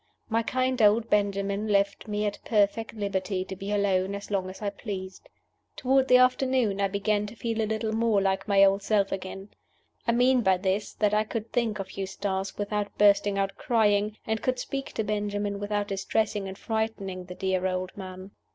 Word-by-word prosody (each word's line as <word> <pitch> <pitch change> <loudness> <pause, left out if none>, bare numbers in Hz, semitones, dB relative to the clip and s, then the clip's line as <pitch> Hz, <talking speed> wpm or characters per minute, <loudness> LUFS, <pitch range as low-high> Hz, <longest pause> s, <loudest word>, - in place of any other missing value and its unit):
My 225 0 +2
kind 255 +1 0
old 220 +2 +4
Benjamin 200 0 +1
left 200 0 +1
me 210 0 -1
at 205 -1 -2
perfect 220 +1 +1
liberty 195 -2 -2
to 190 - -6
be 195 +2 -5
alone 200 -1 +1
as 200 +1 -8
long 190 -2 0
as 185 - -10
I 205 -1 -2
pleased. 190 -2 -7 0.5
Toward 265 +1 +2
the 250 - +7
afternoon 255 -5 +2
I 200 - +3
began 205 +1 0
to 210 - -10
feel 230 -1 -2
a 215 - -1
little 220 0 -1
more 225 -2 +2
like 195 0 0
my 200 -1 +5
old 195 0 +4
self 200 -1 +1
again. 195 +1 -5 0.6
I 235 - +3
mean 250 +1 +4
by 190 -4 +3
this 190 +2 -1
that 210 -1 +1
I 215 0 +3
could 220 +1 -5
think 230 -3 0
of 195 -2 -6
Eustace 195 0 -3
without 205 0 -3
bursting 205 -1 +4
out 195 0 -1
crying, 210 -4 +2
and 220 0 -1
could 255 0 0
speak 275 +2 -4
to 220 - -1
Benjamin 205 -1 -2
without 205 0 -2
distressing 200 +1 -1
and 190 0 -7
frightening 210 -5 -3
the 180 0 -9
dear 190 0 0
old 185 0 -3
man. 185 0 -8
205 Hz, 190 wpm, -27 LUFS, 195-220 Hz, 0.6 s, the